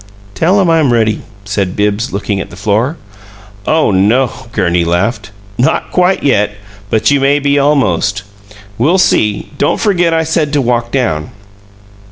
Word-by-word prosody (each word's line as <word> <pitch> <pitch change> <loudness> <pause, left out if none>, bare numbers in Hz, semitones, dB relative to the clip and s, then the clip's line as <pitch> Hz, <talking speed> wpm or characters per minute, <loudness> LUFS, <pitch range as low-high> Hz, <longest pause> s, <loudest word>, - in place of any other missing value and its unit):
"Tell 180 - +2
him 190 - +2
I'm 160 -5 +3
ready," 110 -2 +1 0.2
said 100 -2 -2
Bibbs, 105 +3 -1
looking 100 0 -2
at - - -8
the 90 - -12
floor. 110 - -1 0.7
"Oh 155 -8 +2
no," 110 +7 +2 0.2
Gurney 85 -6 +1
laughed. 95 +7 -1 0.3
"Not 130 - 0
quite 180 +1 +1
yet; 105 -7 +1 0.4
but 110 +6 +2
you 140 - +3
may 140 +1 +3
be 145 0 +1
almost. 105 - +1 0.6
We'll 155 +10 +3
see. 105 - +1
Don't - - +1
forget 175 -5 +1
I 160 0 +1
said 155 -2 -1
to 145 - +2
walk 120 -2 0
down." 80 - -1
120 Hz, 155 wpm, -13 LUFS, 100-150 Hz, 0.7 s, I'm